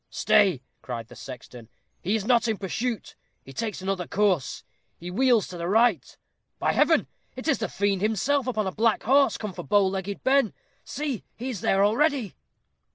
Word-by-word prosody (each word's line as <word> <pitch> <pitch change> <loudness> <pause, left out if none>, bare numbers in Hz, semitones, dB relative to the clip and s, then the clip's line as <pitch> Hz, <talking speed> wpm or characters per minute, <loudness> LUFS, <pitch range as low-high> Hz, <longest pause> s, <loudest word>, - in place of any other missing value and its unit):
"Stay," 185 -11 +3 0.2
cried 115 -3 -6
the - - -12
sexton. 125 -3 -10 0.3
"He 200 +5 0
is 210 -3 -2
not 240 0 +3
in 220 -2 0
pursuit 220 +5 -3 0.3
he 135 - -11
takes 210 - -4
another 190 -2 -2
course 195 -8 0 0.4
he 175 +1 -7
wheels 240 +1 +3
to 180 - -8
the 170 - -3
right. 215 - +2 0.4
By - - +1
Heaven! - - +3 0.3
it - - -7
is - - +2
the - - -2
Fiend 200 -1 0
himself 240 +6 +1
upon 215 -4 -1
a 190 - -1
black 225 +2 +1
horse, 275 +4 +4
come 210 -3 -5
for - - -6
Bow 205 -1 +3
legged 195 +1 -3
Ben. 265 -5 +3 0.3
See, 275 -6 -4
he 255 +3 -4
is 210 - -6
there 195 +1 +3
already." 250 - +1
205 Hz, 180 wpm, -26 LUFS, 185-240 Hz, 0.4 s, horse